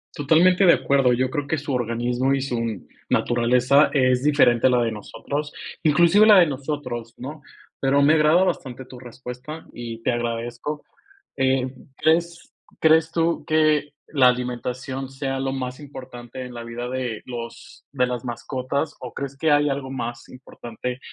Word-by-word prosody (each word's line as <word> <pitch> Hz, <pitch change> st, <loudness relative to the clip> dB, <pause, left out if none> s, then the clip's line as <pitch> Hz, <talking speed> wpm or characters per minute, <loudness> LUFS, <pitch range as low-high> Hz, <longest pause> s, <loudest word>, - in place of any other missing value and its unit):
Totalmente 175 Hz, +6 st, +4 dB
de 170 Hz, -, +8 dB
acuerdo. 135 Hz, -3 st, +2 dB
Yo 130 Hz, +1 st, 0 dB
creo 145 Hz, 0 st, -3 dB
que 160 Hz, -, 0 dB
su 145 Hz, -1 st, -4 dB
organismo 120 Hz, +2 st, 0 dB
y 135 Hz, -, -2 dB
su 115 Hz, -6 st, -3 dB, 0.2 s
naturaleza 125 Hz, +4 st, +3 dB
es 130 Hz, -2 st, +2 dB
diferente 130 Hz, -5 st, +4 dB
a -, -, +4 dB
la 125 Hz, -1 st, +3 dB
de 115 Hz, -, -1 dB
nosotros, 140 Hz, +7 st, -5 dB, 0.3 s
inclusive 170 Hz, +7 st, +5 dB
la 210 Hz, -3 st, +8 dB
de 175 Hz, -, +7 dB
nosotros, 135 Hz, -5 st, -5 dB
¿no? 145 Hz, +4 st, -8 dB, 0.4 s
Pero 140 Hz, +1 st, +2 dB
me 150 Hz, +2 st, +5 dB
agrada 160 Hz, +4 st, +4 dB
bastante 130 Hz, -7 st, -3 dB
tu 125 Hz, -1 st, -12 dB
respuesta 125 Hz, +5 st, -9 dB
y 115 Hz, -1 st, -7 dB
te -, -, +1 dB
agradezco. 120 Hz, +5 st, -4 dB, 0.5 s
Eh, 130 Hz, -1 st, +1 dB, 0.2 s
¿crees 170 Hz, +2 st, 0 dB, 0.3 s
crees 160 Hz, 0 st, +4 dB
tú 165 Hz, 0 st, 0 dB
que 155 Hz, -2 st, +2 dB
la 135 Hz, -4 st, +4 dB
alimentación 125 Hz, +2 st, -3 dB
sea 135 Hz, 0 st, -3 dB
lo 135 Hz, 0 st, -1 dB
más 130 Hz, 0 st, -4 dB
importante 130 Hz, -3 st, -9 dB
en 125 Hz, -, -9 dB
la 120 Hz, -1 st, -7 dB
vida 120 Hz, +1 st, -6 dB
de 125 Hz, -3 st, -4 dB
los 115 Hz, -2 st, -9 dB
de 125 Hz, -3 st, +1 dB
las 125 Hz, -1 st, -4 dB
mascotas 130 Hz, +5 st, -3 dB
o 125 Hz, -, -8 dB
crees 140 Hz, 0 st, -5 dB
que 160 Hz, +2 st, +1 dB
hay 145 Hz, 0 st, +4 dB
algo 135 Hz, -1 st, -3 dB
más 120 Hz, -2 st, -5 dB
importante 125 Hz, -1 st, -7 dB
130 Hz, 160 wpm, -23 LUFS, 120-145 Hz, 0.5 s, de